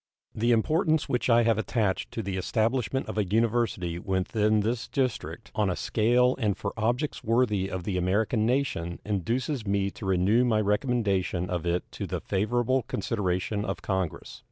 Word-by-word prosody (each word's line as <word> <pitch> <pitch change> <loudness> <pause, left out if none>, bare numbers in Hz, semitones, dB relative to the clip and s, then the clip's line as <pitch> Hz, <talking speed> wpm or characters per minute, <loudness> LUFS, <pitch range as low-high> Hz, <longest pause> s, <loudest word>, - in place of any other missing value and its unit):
The 120 +2 +1
importance 155 +6 +2
which 125 +1 0
I 120 0 +5
have 115 -2 +2
attached 110 -4 -1
to 115 - -4
the 100 -1 -3
establishment 115 +6 0
of - - -3
a - - +3
university 110 -4 0
within 105 +4 +1
this 115 +3 -2
District 130 -3 -3
on 105 -2 +1
a 90 - 0
scale 125 +3 +2
and 105 -5 0
for 100 - -4
objects 120 +7 -1
worthy 110 -4 +1
of 95 -2 -4
the 95 0 -2
American 105 +5 +1
nation 115 -9 -1
induces 115 - -1
me 100 0 +1
to 95 - -7
renew 95 +6 +3
my 115 -3 +2
recommendation 100 -5 0
of 85 -1 -2
it 85 +1 +1
to - - -5
the - - -3
favorable 120 +6 0
consideration 100 -1 -2
of 95 -3 -4
Congress. 95 -3 -3
110 Hz, 165 wpm, -27 LUFS, 95-120 Hz, -, I